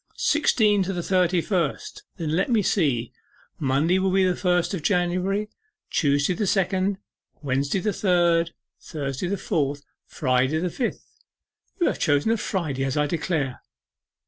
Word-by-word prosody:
'Sixteen 220 Hz, -9 st, +3 dB
to 190 Hz, +1 st, -1 dB
the 175 Hz, -2 st, -3 dB
thirty 180 Hz, -1 st, +2 dB
first. 170 Hz, -6 st, -2 dB, 0.2 s
Then 160 Hz, -2 st, -2 dB
let 190 Hz, +7 st, +1 dB
me 225 Hz, -4 st, +3 dB
see, 135 Hz, -, 0 dB, 0.5 s
Monday 150 Hz, +7 st, +2 dB
will 190 Hz, 0 st, +1 dB
be 190 Hz, 0 st, +3 dB
the 180 Hz, -1 st, +1 dB
first 180 Hz, -1 st, +1 dB
of 185 Hz, -, -3 dB
January, 185 Hz, +4 st, 0 dB, 0.4 s
Tuesday 145 Hz, +2 st, +2 dB
the 210 Hz, +2 st, -2 dB
second, 190 Hz, +1 st, +1 dB, 0.5 s
Wednesday 140 Hz, +6 st, 0 dB
third, 175 Hz, -4 st, +2 dB, 0.3 s
Thursday 150 Hz, +4 st, -3 dB
fourth, 145 Hz, -5 st, -2 dB, 0.2 s
Friday 130 Hz, +5 st, 0 dB
fifth 240 Hz, +8 st, -5 dB, 0.6 s
you 345 Hz, -, +3 dB
have -, -, 0 dB
chosen 145 Hz, +6 st, +2 dB
a 230 Hz, -, +2 dB
Friday, 160 Hz, -10 st, -2 dB
as 135 Hz, +1 st, -1 dB
I 150 Hz, -, +3 dB
declare! 150 Hz, -4 st, -2 dB
175 Hz, 140 wpm, -24 LUFS, 145-190 Hz, 0.6 s, Sixteen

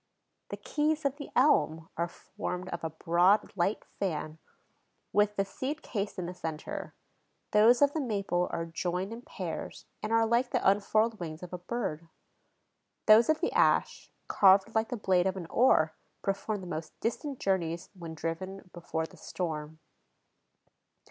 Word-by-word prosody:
The -, -, -5 dB
"keys" 305 Hz, 0 st, 0 dB
of 280 Hz, 0 st, 0 dB
the 285 Hz, -, -7 dB
elm 165 Hz, -, +3 dB
are 170 Hz, +1 st, 0 dB
formed 185 Hz, 0 st, -6 dB
of 170 Hz, -, -5 dB
a 160 Hz, -, -1 dB
broad, 175 Hz, +6 st, +2 dB
light 195 Hz, +3 st, 0 dB
fan 160 Hz, -4 st, -4 dB, 0.7 s
with 210 Hz, 0 st, +3 dB
the 195 Hz, -, +1 dB
seed 275 Hz, +9 st, -4 dB
cased 205 Hz, -3 st, -3 dB
in 180 Hz, -, -3 dB
the 180 Hz, -, -5 dB
center; 160 Hz, -3 st, -6 dB, 0.6 s
those 235 Hz, +5 st, +6 dB
of 285 Hz, 0 st, +4 dB
the 315 Hz, -, -1 dB
maple 200 Hz, -7 st, 0 dB
are 165 Hz, -1 st, -2 dB
joined 180 Hz, +4 st, -3 dB
in 230 Hz, -, -8 dB
pairs -, -, -6 dB, 0.2 s
and 215 Hz, -, -3 dB
are 225 Hz, 0 st, +4 dB
like 235 Hz, +2 st, +2 dB
the -, -, +1 dB
unfurled 215 Hz, +3 st, +2 dB
wings 160 Hz, -1 st, -6 dB
of 180 Hz, -, -9 dB
a 180 Hz, -, -4 dB
bird; 175 Hz, -5 st, -4 dB, 1.0 s
those 220 Hz, +4 st, +7 dB
of 315 Hz, +1 st, +2 dB
the 350 Hz, -, +1 dB
ash, -, -, +2 dB, 0.2 s
carved 195 Hz, +2 st, +5 dB
like 220 Hz, 0 st, +1 dB
the 245 Hz, -, -3 dB
blade 185 Hz, -3 st, +2 dB
of 190 Hz, 0 st, -1 dB
an 180 Hz, -, -5 dB
oar, 160 Hz, -10 st, +4 dB, 0.3 s
perform 200 Hz, +1 st, -1 dB
the -, -, -8 dB
most 160 Hz, -2 st, -6 dB
distant 270 Hz, +4 st, -2 dB
journeys 170 Hz, -3 st, -1 dB
when 170 Hz, -4 st, -8 dB
driven 180 Hz, +4 st, -5 dB
before 160 Hz, -2 st, -3 dB
the -, -, -15 dB
storm. 160 Hz, -3 st, -4 dB
190 Hz, 160 wpm, -30 LUFS, 170-225 Hz, 1.0 s, those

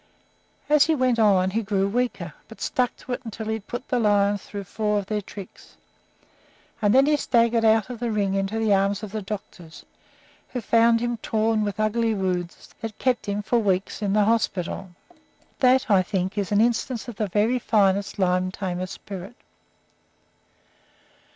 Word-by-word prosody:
As 300 Hz, 0 st, +5 dB
he 320 Hz, -, +2 dB
went 255 Hz, -4 st, +1 dB
on 190 Hz, -4 st, +4 dB
he 225 Hz, +3 st, 0 dB
grew 195 Hz, -2 st, 0 dB
weaker, 245 Hz, +4 st, -2 dB
but -, -, -13 dB
stuck 250 Hz, -2 st, 0 dB
to 255 Hz, -, -6 dB
it 250 Hz, -, -4 dB
until 225 Hz, -1 st, -6 dB
he 220 Hz, -, -1 dB
had 220 Hz, -2 st, -6 dB
put 245 Hz, +2 st, -6 dB
the 250 Hz, -, 0 dB
lions 205 Hz, -2 st, +2 dB
through 205 Hz, -1 st, -7 dB
four 210 Hz, +2 st, -1 dB
of 200 Hz, -, -2 dB
their 210 Hz, +1 st, -2 dB
tricks, 200 Hz, -1 st, -12 dB, 1.0 s
and 205 Hz, -1 st, +3 dB
then 270 Hz, +1 st, +6 dB
he 300 Hz, +1 st, +3 dB
staggered 235 Hz, -4 st, +2 dB
out 220 Hz, -1 st, +4 dB
of 240 Hz, -, -7 dB
the 240 Hz, 0 st, -2 dB
ring 205 Hz, -3 st, 0 dB
into 195 Hz, +2 st, -1 dB
the 220 Hz, -2 st, +2 dB
arms 200 Hz, +1 st, +1 dB
of 210 Hz, -, -6 dB
the 215 Hz, -, -3 dB
doctors, 190 Hz, -5 st, -8 dB, 0.6 s
who 250 Hz, -, -4 dB
found 230 Hz, +1 st, +3 dB
him 240 Hz, 0 st, -1 dB
torn 220 Hz, 0 st, 0 dB
with 205 Hz, 0 st, -3 dB
ugly 220 Hz, +1 st, +1 dB
wounds 180 Hz, -3 st, -3 dB
that 225 Hz, -1 st, -6 dB
kept 255 Hz, -4 st, 0 dB
him 205 Hz, +1 st, -2 dB
for 235 Hz, +3 st, +1 dB
weeks 195 Hz, -1 st, -1 dB
in 200 Hz, -2 st, 0 dB
the 210 Hz, -1 st, +4 dB
hospital. 195 Hz, -4 st, -1 dB, 0.7 s
That, 255 Hz, 0 st, +4 dB
I 200 Hz, -4 st, +5 dB
think, 185 Hz, 0 st, -2 dB
is 205 Hz, -2 st, -2 dB
an 205 Hz, +1 st, +4 dB
instance 235 Hz, +1 st, 0 dB
of 235 Hz, -4 st, -8 dB
the 215 Hz, -, -1 dB
very 215 Hz, +6 st, +1 dB
finest 200 Hz, -3 st, +1 dB
lion 185 Hz, -1 st, +1 dB
tamer 185 Hz, -1 st, -4 dB
spirit. 195 Hz, +3 st, -9 dB
215 Hz, 180 wpm, -24 LUFS, 195-230 Hz, 1.0 s, then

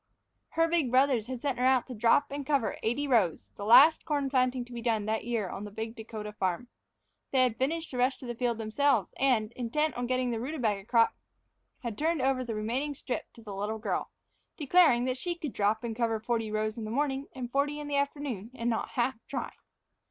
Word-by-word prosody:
Her 330 Hz, 0 st, +5 dB
big 330 Hz, -6 st, +1 dB
brothers 255 Hz, -3 st, +3 dB
had 255 Hz, -2 st, -6 dB
sent 275 Hz, -4 st, -1 dB
her -, -, +1 dB
out 260 Hz, -2 st, +4 dB
to 255 Hz, -, -7 dB
drop 230 Hz, +5 st, +3 dB
and 285 Hz, 0 st, -3 dB
cover 275 Hz, -5 st, 0 dB
eighty 260 Hz, +6 st, 0 dB
rows, 215 Hz, -, +1 dB
the 200 Hz, -, -7 dB
last 275 Hz, +9 st, +7 dB
corn 285 Hz, -4 st, -1 dB
planting 255 Hz, -1 st, +1 dB
to 245 Hz, -, -13 dB
be 235 Hz, -, -5 dB
done 225 Hz, -3 st, 0 dB
that 220 Hz, +1 st, -1 dB
year 230 Hz, -5 st, -1 dB
on 195 Hz, -, -6 dB
the 210 Hz, -, -6 dB
big 220 Hz, +2 st, -5 dB
Dakota 215 Hz, -1 st, -7 dB
farm. 190 Hz, +4 st, -2 dB, 0.6 s
They 260 Hz, -1 st, +4 dB
had 245 Hz, -3 st, +1 dB
finished 320 Hz, +5 st, -1 dB
the 250 Hz, -, -4 dB
rest 255 Hz, +2 st, +1 dB
of -, -, -6 dB
the 240 Hz, -, -3 dB
field 235 Hz, -1 st, -1 dB
themselves 225 Hz, 0 st, +1 dB
and, 240 Hz, -5 st, +2 dB
intent 280 Hz, +6 st, -1 dB
on 245 Hz, 0 st, -2 dB
getting 255 Hz, 0 st, 0 dB
in -, -, -1 dB
the 230 Hz, -, -2 dB
rutabaga 230 Hz, -7 st, -2 dB
crop, 230 Hz, 0 st, +4 dB, 0.7 s
had 235 Hz, -4 st, -4 dB
turned 320 Hz, +1 st, +1 dB
over 265 Hz, -1 st, +2 dB
the 230 Hz, -3 st, -4 dB
remaining 250 Hz, +7 st, -2 dB
strip 250 Hz, -, -5 dB
to 230 Hz, -, -15 dB
the 210 Hz, -2 st, -7 dB
little 205 Hz, +3 st, -3 dB
girl, 220 Hz, -, -2 dB, 0.5 s
declaring 295 Hz, -5 st, +4 dB
that 255 Hz, 0 st, -2 dB
she 345 Hz, +4 st, -2 dB
could 305 Hz, -6 st, -5 dB
drop 210 Hz, +2 st, +1 dB
and 230 Hz, -2 st, -3 dB
cover 225 Hz, -2 st, 0 dB
forty 225 Hz, -1 st, -1 dB
rows 215 Hz, +1 st, -2 dB
in -, -, -4 dB
the -, -, -5 dB
morning 275 Hz, +2 st, -1 dB
and 245 Hz, -2 st, -5 dB
forty 290 Hz, +2 st, 0 dB
in 295 Hz, -, -6 dB
the 285 Hz, -1 st, 0 dB
afternoon, 280 Hz, -7 st, -2 dB
and 235 Hz, -1 st, -1 dB
not 225 Hz, -, -2 dB
half 245 Hz, -1 st, 0 dB
try. -, -, -4 dB
245 Hz, 225 wpm, -29 LUFS, 220-275 Hz, 0.7 s, last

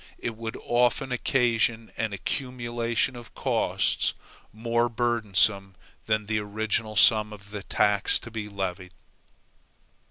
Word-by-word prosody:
It 115 Hz, -, -5 dB
would 115 Hz, 0 st, -6 dB
often 120 Hz, +2 st, +1 dB
occasion 120 Hz, -2 st, +1 dB
an 115 Hz, -2 st, -2 dB
accumulation 120 Hz, +2 st, -2 dB
of 120 Hz, -1 st, -12 dB
costs, -, -, 0 dB, 0.4 s
more 115 Hz, +2 st, 0 dB
burdensome 110 Hz, -4 st, +1 dB, 0.3 s
than 110 Hz, -1 st, 0 dB
the 110 Hz, +1 st, -1 dB
original 110 Hz, +1 st, -2 dB
sum 105 Hz, +1 st, +6 dB
of 100 Hz, -1 st, -12 dB
the 105 Hz, -1 st, -5 dB
tax 100 Hz, +1 st, +2 dB
to 120 Hz, -, -10 dB
be 110 Hz, -2 st, -5 dB
levied. 95 Hz, -2 st, -5 dB
110 Hz, 120 wpm, -26 LUFS, 105-120 Hz, 0.4 s, sum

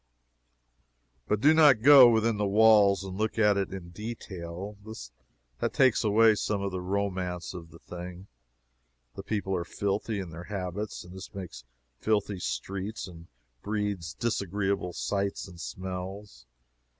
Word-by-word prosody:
But 105 Hz, 0 st, 0 dB
do 150 Hz, +4 st, +6 dB
not 145 Hz, -8 st, +6 dB
go 135 Hz, -3 st, +10 dB
within 115 Hz, -1 st, +2 dB
the 105 Hz, 0 st, 0 dB
walls 100 Hz, -2 st, +5 dB
and 95 Hz, -1 st, -6 dB
look 110 Hz, +2 st, -2 dB
at 105 Hz, -2 st, +4 dB
it 100 Hz, -1 st, -1 dB
in 95 Hz, -3 st, -7 dB
detail. 95 Hz, -2 st, -7 dB, 0.8 s
That -, -, -1 dB
takes 130 Hz, -4 st, +4 dB
away 110 Hz, +1 st, +5 dB
some 105 Hz, 0 st, -1 dB
of 100 Hz, -, -2 dB
the 90 Hz, 0 st, -4 dB
romance 90 Hz, -2 st, -2 dB
of 85 Hz, -3 st, -9 dB
the 85 Hz, -, -14 dB
thing. 90 Hz, +2 st, -9 dB, 0.9 s
The -, -, -7 dB
people 100 Hz, -1 st, -2 dB
are 85 Hz, -, -1 dB
filthy 100 Hz, +3 st, -2 dB
in 90 Hz, -4 st, -6 dB
their 85 Hz, +2 st, -8 dB
habits, 100 Hz, +1 st, -5 dB
and 90 Hz, 0 st, -13 dB
this 95 Hz, -, -9 dB
makes 85 Hz, -11 st, -8 dB, 0.3 s
filthy 105 Hz, -3 st, 0 dB
streets 95 Hz, -, -4 dB
and 85 Hz, -2 st, -12 dB, 0.3 s
breeds 100 Hz, -5 st, -3 dB
disagreeable 100 Hz, -4 st, -1 dB
sights 100 Hz, +2 st, -2 dB
and 85 Hz, -2 st, -11 dB
smells. 95 Hz, -3 st, -7 dB
100 Hz, 145 wpm, -28 LUFS, 90-105 Hz, 0.9 s, go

